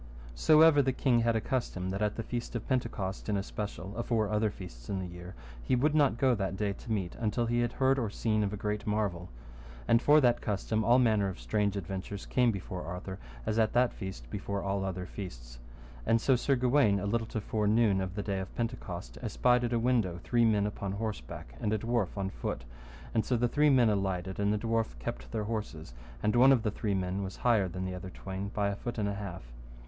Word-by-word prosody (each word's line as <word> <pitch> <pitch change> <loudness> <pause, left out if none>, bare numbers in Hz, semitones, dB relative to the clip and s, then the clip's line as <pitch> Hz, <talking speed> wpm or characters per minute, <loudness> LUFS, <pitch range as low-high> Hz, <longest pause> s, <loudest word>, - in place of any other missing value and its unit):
So 155 - +5
ever 160 -3 +7
the 135 -1 +1
king 125 -2 +2
had 115 0 +2
a - - +3
custom 95 -8 -2
that 100 +2 -3
at 105 0 +1
the 115 - -3
feast 120 +1 -5
of 115 - -4
Pentecost 115 -7 -2
in 105 - +1
especial, 100 -1 -5
afore 115 -2 0
other 105 0 +2
feasts 85 -12 -10
in 100 - -1
the 95 - -3
year, 90 +1 -9 0.3
he 125 - +1
would 145 +5 +2
not 145 -7 +3
go 130 0 +3
that 95 -3 -2
day 100 -1 0
to 115 - -9
meat 95 -5 -1
until 115 +1 0
he 120 +1 +1
had 120 0 0
heard 135 0 +2
or 115 -4 -1
seen 110 0 0
of 100 - -1
a 105 - -4
great 105 +1 -3
marvel. 100 -5 -1 0.6
And 115 - +5
for 150 +4 +6
that 120 -4 +3
custom 110 +1 -1
all 120 +4 +5
manner 110 -5 +3
of 95 - -7
strange 105 -2 0
adventures 95 +1 -5
came 125 -2 +3
before 95 -2 -5
Arthur 90 +2 -6 0.3
as 110 - 0
at 110 -1 +2
that 125 0 +3
feast 95 - -7
before 100 0 -3
all 100 0 -1
other 95 -1 -3
feasts. - - -8 0.4
And 115 - +3
so 130 +3 +3
Sir 135 +3 +2
Gawaine, 125 -5 +3
a 100 - -3
little 115 +2 0
to 110 - -3
fore 105 0 -1
noon 105 -3 +3
of 95 0 -4
the 100 - -2
day 100 -2 -2
of 95 - -7
Pentecost, 90 - -4
espied 125 -1 +2
at 120 - -2
a 120 - +2
window 115 -7 +1
three 120 -1 +3
men 105 -2 +3
upon 100 -2 -3
horseback, 100 - -5
and 105 - -1
a - - +2
dwarf 115 -3 -1
on 95 -1 -2
foot, - - -4 0.5
and 110 - +2
so 125 - 0
the 120 +1 +2
three 150 +5 +3
men 125 -5 +5
alighted, 95 -2 -2
and 100 0 +2
the 105 - +1
dwarf 115 - -1
kept - - -6
their 105 - -1
horses, 105 - -5 0.3
and 105 +2 +2
one 130 +3 +7
of 125 -5 +4
the 110 - 0
three 105 -1 -1
men 95 +1 -1
was 95 -1 -5
higher 110 -6 +4
than 90 +1 -4
the 95 - -3
other 90 +1 -6
twain 95 +1 -5
by 100 -1 0
a 100 - -2
foot 120 +4 -5
and 105 -2 0
an 100 - -1
half. 100 -6 -6
105 Hz, 235 wpm, -31 LUFS, 95-120 Hz, 0.6 s, ever